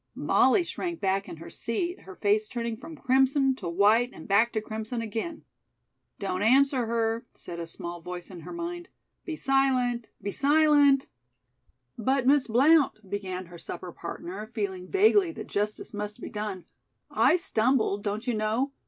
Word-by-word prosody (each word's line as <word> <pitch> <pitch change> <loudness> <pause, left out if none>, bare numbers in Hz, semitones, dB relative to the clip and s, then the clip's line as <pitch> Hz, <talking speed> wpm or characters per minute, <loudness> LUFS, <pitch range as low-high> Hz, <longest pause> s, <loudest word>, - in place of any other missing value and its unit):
Molly 380 - +3
shrank 340 0 -4
back 195 0 0
in - - -8
her 165 - -10
seat, 345 +10 -3
her 190 - -12
face 210 +2 +1
turning 235 -2 -3
from 315 +7 -10
crimson 265 +1 +3
to 180 -8 -5
white 210 +7 +4
and 160 - -11
back 220 +4 +4
to 220 - +1
crimson 220 +2 -5
again. 230 +9 -4 0.7
"Don't 190 -2 -3
answer 260 +2 +4
her," 230 +1 -1
said 170 -1 -8
a 170 - -5
small 170 +1 -7
voice 180 +2 -7
in 180 - -9
her 160 - -9
mind. 345 +1 -5 0.4
"Be 325 - -4
silent! 260 -4 +1
Be 200 - -4
silent!" 285 0 +4 0.9
"But, 260 +3 +1
Miss 275 0 +4
Blount," 265 -2 +4
began 185 -2 -4
her 175 0 -12
supper 180 +1 -7
partner, 185 +5 -7
feeling 195 -5 -4
vaguely 395 -2 +4
that - - -7
justice 210 +2 -3
must 210 +2 -5
be - - -7
done, 210 -4 -4 0.5
"I - - +4
stumbled, 225 - +1
don't 210 +2 -3
you 245 - 0
know? 220 +5 0
225 Hz, 160 wpm, -27 LUFS, 200-275 Hz, 0.9 s, white